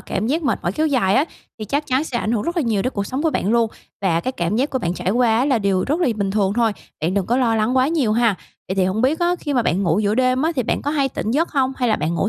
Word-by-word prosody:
cảm 220 - -3
giác 315 +6 0
mệt 280 - 0
mỏi 175 - -1
kéo 310 +8 0
dài 245 -10 +2
á 270 - +4 0.3
thì 215 - -5
chắc 285 +8 -2
chắn 265 +2 +1
sẽ 245 -6 -3
ảnh 225 - -1
hưởng 220 -3 0
rất 345 +1 -3
là 330 - +2
nhiều 220 -5 0
đến 255 - -2
cuộc 200 -1 -3
sống 265 +3 -3
của 325 - +2
bạn 205 - -1
luôn. 230 -1 +2 0.3
Và 170 -4 +1
cái 255 - -3
cảm 175 -2 -1
giác 270 +4 0
của 260 - -1
bạn 175 -5 -2
trải 185 - -2
quá 230 0 +3
á 250 - +2
là 270 -4 +2
điều 195 -3 +1
rất 305 +6 0
lỳ 280 -10 +2
bình 200 -2 -2
thường 195 -1 +1
thôi. 230 0 +2 0.3
Bạn 165 +4 0
đừng 195 -3 0
có 240 - +1
lo 235 -3 +2
lắng 220 +4 +1
quá 255 +1 +3
nhiều 285 -10 +1
ha. 230 -3 +3 0.3
Vậy 190 - -1
thì 190 -1 +2
hổng 190 +5 0
biết 280 +5 +2
á, 350 +1 +2
khi 290 -3 -3
mà 245 - +3
bạn 185 +2 0
ngủ 175 0 +1
giữa 210 0 +1
đêm 255 +2 +2
á 325 - +1
thì 255 - +1
bạn - - -2
có 290 - -1
hay 280 -3 +1
tỉnh 220 - -4
giấc 315 +8 +1
hông, 265 -3 +1
hay 250 -2 0
là 215 - +2
bạn 160 +3 -2
ngủ 195 - 0
235 Hz, 335 wpm, -20 LUFS, 200-270 Hz, 0.3 s, á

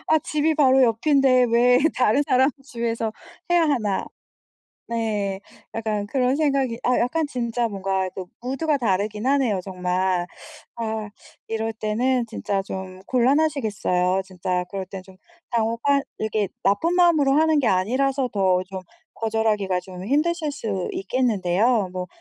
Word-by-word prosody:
아 315 - +5
'집이 305 +1 0
바로 265 -3 +5
옆인데 255 +2 +4
왜 245 +2 +5 0.2
다른 250 +3 +3
사람 260 0 +3
집에서 230 -3 -3 0.4
해야 350 -1 +4
하나.' 235 -11 0 0.8
네. 210 -4 -2 0.3
약간 215 -2 -2
그런 255 +3 +1
생각이 275 -6 0
아 250 - +2
약간 305 +6 0
진짜 240 -3 -2
뭔가 195 -2 -1
또 185 -2 -7
무드가 280 +5 0
다르긴 210 -1 -1
하네요 260 -8 +2
정말. 180 -1 -1 0.5
아 220 -2 -3 0.4
이럴 225 0 -2
때는 235 +3 0
진짜 200 -3 -2
좀 190 -1 -7
곤란하시겠어요. 235 -9 +1
진짜 180 -1 -2
그럴 195 -1 -4
땐 190 -1 -8
좀 190 0 -17 0.3
당혹한 235 +4 +1 0.2
이렇게 215 -2 -1
나쁜 265 - +2
마음으로 325 -6 +4
하는 315 +1 +3
게 265 - +2
아니라서 260 +8 +1
더 190 -4 +1
좀 190 0 -7 0.3
거절하기가 215 -4 0
좀 180 0 -9
힘드실 305 - 0
수 205 -9 -3
있겠는데요. 210 -1 +1
뭐 180 0 -4
225 Hz, 285 characters per minute, -23 LUFS, 195-270 Hz, 0.8 s, 아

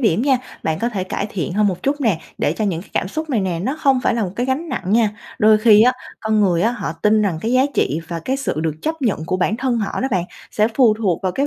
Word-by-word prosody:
điểm 220 -4 +2
nha, 265 -2 +3 0.2
bạn 160 0 -1
có 235 - 0
thể 195 -6 -3
cải 195 - -3
thiện 175 -4 -3
hơn 210 +2 +2
một 180 -2 -2
chút 285 +2 0
nè, 215 - +1 0.2
để 145 - +1
cho 215 - -2
những 175 -5 -1
cái - - -20
cảm 185 - -1
xúc 310 +8 -4
này 235 - +1
nè 185 -3 -1
nó 270 +7 -2
không 270 -2 +3
phải - - +2
là 230 - 0
một 180 - -4
cái 245 - -1
gánh 285 +6 -1
nặng 255 - -3
nha. 225 -2 +4 0.3
Đôi 215 0 +5
khi 215 -1 +6
á, 250 +2 +5 0.3
con 220 -1 +1
người 180 -4 +2
á 225 - +3
họ 240 -9 -4
tin 215 0 +4
rằng 185 -6 0
cái 225 +6 -1
giá 255 +1 +5
trị 155 +4 +1
và 170 -1 -4
cái 265 +1 0
sự 270 - -2
được 160 -2 -1
chấp 320 -1 -3
nhận 205 -10 0
của 185 - 0
bản 210 +4 0
thân 250 -1 0
họ 210 - -2
đó 265 - 0
bạn, 185 -5 0 0.3
sẽ 215 +1 +2
phù 240 -5 +5
thuộc 200 -6 -1
vào 185 -1 0
cái 275 +7 0
215 Hz, 300 wpm, -20 LUFS, 185-255 Hz, 0.3 s, khi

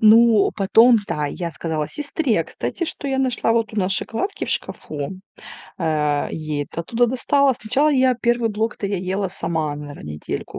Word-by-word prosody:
Ну, 220 -1 +6
потом, 225 +4 +6
да, 150 -1 -1
я 170 +3 -4
сказала 155 -1 -3
сестре, 285 - 0
кстати, 340 - -4
что 285 - -4
я 265 0 0
нашла 250 -3 +1
вот 230 -1 0
у - - -8
нас 190 -1 +1
шоколадки 305 - -2
в - - -8
шкафу, 155 +5 -3 0.6
э, 150 -3 0
ей 155 -2 -3
это 170 - -6
оттуда 235 +8 +1
достала. 270 +2 +2
Сначала, 265 +8 +1
я 260 -2 +3
1 235 -1 +1
блок-то 210 -1 -2
я 200 0 -1
ела 190 +2 -2
сама, 160 -4 -2
наверное, 145 - -8
недельку 75 - -6
210 Hz, 170 wpm, -21 LUFS, 160-240 Hz, 0.6 s, Ну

